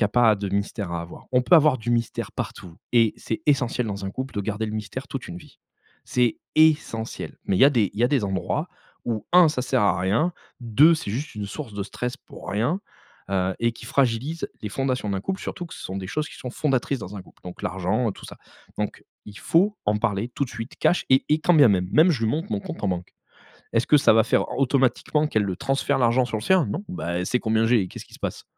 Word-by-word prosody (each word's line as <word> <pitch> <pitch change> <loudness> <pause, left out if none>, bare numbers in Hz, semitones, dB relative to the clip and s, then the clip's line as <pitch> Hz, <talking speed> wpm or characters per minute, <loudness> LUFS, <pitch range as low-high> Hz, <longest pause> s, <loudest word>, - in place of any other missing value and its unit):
y - - +4
a - - +2
pas 115 0 +4
de 100 -1 -4
mystère 100 0 -2
à 85 - -2
avoir. 85 - -12
On 125 -1 +3
peut 175 - +4
avoir 155 -4 +6
du 120 0 -4
mystère 115 -2 -1
partout 85 -3 -6 0.2
et 115 -2 +4
c'est 160 - -4
essentiel 130 -4 +1
dans 100 -1 -4
un - - -3
couple 130 +5 -5
de 105 - -1
garder 110 +2 -2
le 105 - -4
mystère 110 +5 -5
toute 135 - -5
une 85 - -7
vie. - - -14 0.5
C'est 120 -2 +1 0.2
essentiel 150 -8 +1
mais 95 - +1
il - - +1
y 135 - +9
a - - +5
des 115 -8 +2
il 105 - -6
y - - +5
a - - +3
des 130 -7 +1
endroits 95 -2 -2 0.4
où 110 -3 -3
1 175 -3 +7
ça 140 - -2
sert 130 -1 +1
à 95 -3 +2
rien, 110 - +1 0.3
2 130 +8 +5
c'est 155 -10 -4
juste 135 +8 -4
une 105 -1 -4
source 110 +2 -7
de 100 - -2
stress 125 +5 -4
pour - - -13
rien, 120 - 0 0.5
heu, 95 -1 0
et 115 0 +1
qui - - -12
fragilise 135 +5 0
les 105 - -3
fondations 130 -2 -1
d'un 95 -1 -1
couple, 190 - -3
surtout 175 - -5
que - - -11
ce - - -10
sont 95 - -5
des 95 - -5
choses 155 +9 -2
qui - - -12
sont 125 - -6
fondatrices 135 -1 0
dans 100 -1 -8
un - - -6
couple, - - -22
donc 90 -1 -9
l'argent, 95 +6 0
heu, 105 - -2
tout - - -14
ça, - - -10 0.4
donc 105 -1 -3 0.2
il 105 -1 -10
faut 200 +5 +2
en 105 0 +2
parler 110 0 -1
tout 140 - -2
de - - -12
suite, 115 +1 -7
cash, 175 - +3
et 130 0 +5
et 150 - +3
quand 175 - +3
bien 145 -6 +7
même, 90 -2 +2
même 160 +4 +6
je 120 -9 0
lui 110 - +2
montre 165 +6 -2
mon 205 - -1
compte 185 -4 -8
en - - +2
banque. 90 -1 -4 0.6
Est-ce 115 +1 +2
que 150 - +6
ça 145 - +5
va 110 - +5
faire - - +1
automatiquement 135 +3 +2
qu'elle 110 -8 +1
le 95 -2 -3
transfère, 135 +5 0
l'argent 125 +1 +3
sur 110 -2 -3
le 105 - -7
sien, 185 +2 +3
non, 195 - -4
ben, 180 - -5
elle 90 0 -2
sait 125 - +1
combien 110 0 +1
j'ai, 115 -1 +4
et 90 - -5
qu'est-ce - - -9
qui - - -19
se - - -12
passe? - - -4
120 Hz, 260 wpm, -24 LUFS, 105-140 Hz, 0.6 s, y